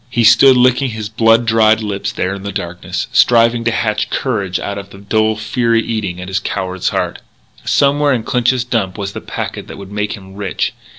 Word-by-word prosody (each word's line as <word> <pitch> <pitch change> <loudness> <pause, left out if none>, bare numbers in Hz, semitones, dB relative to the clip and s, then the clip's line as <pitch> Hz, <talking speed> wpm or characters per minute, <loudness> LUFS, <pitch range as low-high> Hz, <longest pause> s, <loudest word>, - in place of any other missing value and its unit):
He 120 -1 +1
stood 130 +3 +7
licking 125 +2 +3
his 110 -2 -5
blood 115 +2 +3
dried 110 0 +3
lips 100 -1 -3
there 95 -3 -2
in 100 - -7
the 100 +1 -5
darkness, 85 -1 -4
striving 115 0 +4
to 115 - +2
hatch 110 -2 -1
courage 100 -8 -2
out 100 0 -4
of 100 0 -10
the 100 - -13
dull 110 +2 0
fury 115 +1 0
eating 105 -6 -3
at 90 - -7
a 95 +1 -1
coward's 95 -1 -2
heart. - - -2 0.5
Somewhere 145 +1 +2
in 120 -4 0
Clinch's 125 0 +1
Dump 115 -5 -2
was 100 -1 -4
the - - -6
packet - - -6
that - - -9
would 100 0 -10
make 105 0 -2
him 95 -3 -11
rich.... 100 -1 -2
110 Hz, 200 wpm, -16 LUFS, 100-115 Hz, 0.5 s, stood